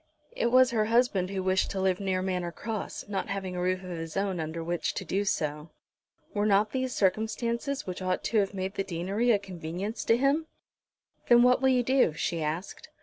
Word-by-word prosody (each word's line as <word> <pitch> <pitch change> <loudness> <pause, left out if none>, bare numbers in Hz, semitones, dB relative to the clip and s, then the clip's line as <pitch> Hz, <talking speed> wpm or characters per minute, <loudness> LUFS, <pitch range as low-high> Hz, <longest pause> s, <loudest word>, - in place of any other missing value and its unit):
It - - +1
was 255 0 +6
her 220 -2 +2
husband 225 -5 +2
who 190 -1 -3
wished 185 0 +1
to 195 - -3
live 190 -1 +1
near 190 -2 -1
Manor 180 -2 -2
Cross, 215 +3 -5
not 195 -2 -2
having 190 -2 -3
a 180 - -2
roof 185 +1 0
of 185 - -7
his 165 -1 -5
own 195 -3 -1
under 160 +1 -4
which 170 0 -2
to 190 - -4
do 195 +4 0
so. 150 -3 -2 0.6
Were 205 0 +1
not 210 +1 +3
these 260 -1 -2
circumstances 230 +6 0
which 185 0 -5
ought 185 0 -1
to 225 - +2
have 195 -1 +1
made 190 0 -3
the 195 - -1
deanery 190 +7 -1
a 225 - +6
convenience 185 +2 -5
to 230 - +4
him? 280 +5 +1 0.8
"Then 240 0 +7
what 250 +1 +4
will 265 - +4
you 250 -1 +3
do?" 255 - +3
she 165 +1 -2
asked. 155 +5 -4
195 Hz, 205 wpm, -28 LUFS, 180-230 Hz, 0.8 s, Then